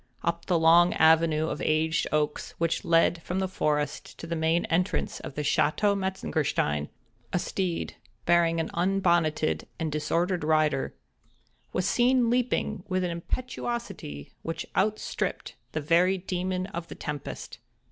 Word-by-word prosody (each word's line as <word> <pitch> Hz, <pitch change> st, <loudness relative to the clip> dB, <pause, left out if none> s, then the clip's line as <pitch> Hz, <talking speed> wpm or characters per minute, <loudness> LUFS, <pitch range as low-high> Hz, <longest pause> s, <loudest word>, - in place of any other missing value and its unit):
Up 170 Hz, 0 st, -1 dB
the 180 Hz, -, +3 dB
long 170 Hz, +2 st, +6 dB
avenue 160 Hz, -1 st, +4 dB
of -, -, -4 dB
aged 160 Hz, +1 st, +1 dB
oaks 150 Hz, -1 st, -1 dB
which 165 Hz, 0 st, 0 dB
led 165 Hz, 0 st, +3 dB
from 180 Hz, +3 st, -3 dB
the 190 Hz, 0 st, 0 dB
forest 150 Hz, -5 st, -2 dB
to -, -, -7 dB
the 170 Hz, 0 st, -3 dB
main 160 Hz, +1 st, +1 dB
entrance 180 Hz, +4 st, 0 dB
of -, -, -8 dB
the 150 Hz, -, -2 dB
Château 200 Hz, +7 st, +2 dB
Metzengerstein, 155 Hz, -, -1 dB, 0.4 s
a -, -, +1 dB
steed, 180 Hz, -1 st, -2 dB, 0.3 s
bearing 170 Hz, -1 st, +3 dB
an 160 Hz, -, -2 dB
unbonneted 175 Hz, -4 st, +1 dB
and 160 Hz, -1 st, -2 dB
disordered 165 Hz, +4 st, 0 dB
rider, 155 Hz, -3 st, +1 dB, 0.8 s
was 180 Hz, -, -1 dB
seen 245 Hz, -1 st, +3 dB
leaping 240 Hz, -5 st, 0 dB
with 185 Hz, -1 st, 0 dB
an 180 Hz, -, -1 dB
impetuosity 195 Hz, -, -5 dB
which 165 Hz, -, -4 dB
outstripped 215 Hz, +2 st, -1 dB, 0.2 s
the 155 Hz, -, -1 dB
very 175 Hz, +5 st, +3 dB
Demon 185 Hz, 0 st, -2 dB
of 170 Hz, -3 st, -6 dB
the -, -, -8 dB
Tempest. 145 Hz, -2 st, -6 dB
170 Hz, 140 wpm, -27 LUFS, 155-185 Hz, 0.8 s, long